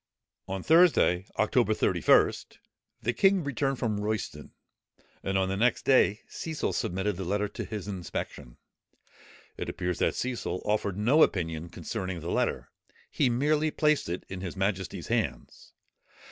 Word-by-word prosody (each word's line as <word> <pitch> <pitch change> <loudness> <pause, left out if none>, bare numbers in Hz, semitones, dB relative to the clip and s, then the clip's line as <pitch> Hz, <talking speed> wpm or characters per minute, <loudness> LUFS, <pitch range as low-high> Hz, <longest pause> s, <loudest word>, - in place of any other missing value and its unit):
On 95 -1 -4
Thursday, 160 - +4
October - - +2
31st, - - +2 0.5
the 120 - +1
king 195 +1 +3
returned 140 -1 -1
from 110 -4 -1
Royston; 105 0 -4 0.7
and 95 0 -1
the 95 0 0
next 120 +5 +1
day 120 -5 +4
Cecil 160 - -3
submitted 95 +3 -1
the 95 - -4
letter 100 +3 0
to - - -6
his 105 -3 -6
inspection. 90 -10 -6 1.0
It - - -4
appears 90 -1 -3
that - - +1
Cecil 120 -7 -3
offered 105 -2 0
no 125 +10 +4
opinion 80 - +1
concerning 90 +1 -5
the 85 +2 -5
letter; - - -1 0.4
he 135 - +2
merely 150 +5 +2
placed 150 - +1
it 90 - -4
in 95 -1 -7
his 95 -1 -5
majesty's 95 -1 -2
hands. - - -3
105 Hz, 140 wpm, -28 LUFS, 95-130 Hz, 1.0 s, Thursday